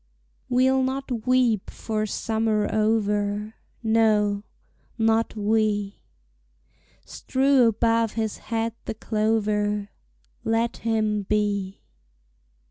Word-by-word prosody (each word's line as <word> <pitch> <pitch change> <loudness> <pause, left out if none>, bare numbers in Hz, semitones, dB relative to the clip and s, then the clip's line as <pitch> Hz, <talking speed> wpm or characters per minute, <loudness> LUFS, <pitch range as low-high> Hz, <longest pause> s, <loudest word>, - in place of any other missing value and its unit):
We'll 260 +1 +3
not 260 -3 -3
weep 250 -5 +2
for 215 -1 -3
summer 220 -1 0
over, 210 -1 0 0.3
No, 215 -2 +2 0.6
not 225 0 +1
we: 210 -1 0 1.0
Strew 265 -2 +2
above 230 0 +1
his 220 -1 -3
head 225 -1 -1
the - - -4
clover, 210 -2 0 0.5
Let 225 +1 0
him 215 -2 0
be! 200 -1 -1
220 Hz, 85 wpm, -24 LUFS, 210-230 Hz, 1.0 s, We'll